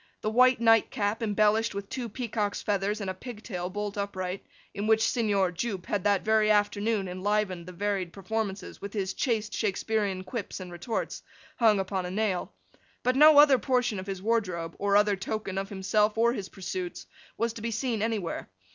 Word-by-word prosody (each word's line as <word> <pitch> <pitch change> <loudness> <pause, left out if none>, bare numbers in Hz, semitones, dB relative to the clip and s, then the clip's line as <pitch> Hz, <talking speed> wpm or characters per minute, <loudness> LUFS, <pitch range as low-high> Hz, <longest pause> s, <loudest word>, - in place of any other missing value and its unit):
The 215 - -1
white 255 +2 +5
night 225 -1 +5
cap, 210 -1 -1
embellished 215 0 +2
with 200 0 -4
two 245 0 -4
peacock's 215 -3 -2
feathers 205 +1 0
and 195 - -3
a - - -5
pigtail 205 -4 -6
bolt 205 +1 -4
upright, 190 -2 -3 0.3
in 205 +2 -3
which 220 0 +4
Signor 200 -6 +1
Jupe 190 0 -3
had 200 -3 -1
that 200 -1 +2
very 220 0 +3
afternoon 205 0 +2
enlivened 185 -1 -1
the - - -7
varied 190 -1 -2
performances 200 0 -4
with 200 0 -6
his 195 -3 -2
chaste 225 -4 -1
Shaksperean 205 -2 -1
quips 215 -2 -5
and 180 -1 -8
retorts, 175 +7 -4 0.4
hung 220 -4 +4
upon 190 -1 -2
a - - -5
nail; 195 -1 -1 0.5
but 255 +1 +2
no 305 +2 +8
other 290 -3 +8
portion 250 -6 +1
of 190 - -7
his 190 -1 -5
wardrobe, 185 -7 -1
or 200 0 +3
other 205 -1 +3
token 195 0 -3
of 195 0 -4
himself 210 +2 +1
or 235 +1 +4
his 200 -6 -5
pursuits, 185 -2 -5 0.3
was 230 0 0
to 230 - -8
be 230 - -2
seen 225 0 -1
anywhere. 215 - -2
205 Hz, 180 wpm, -28 LUFS, 190-225 Hz, 0.5 s, no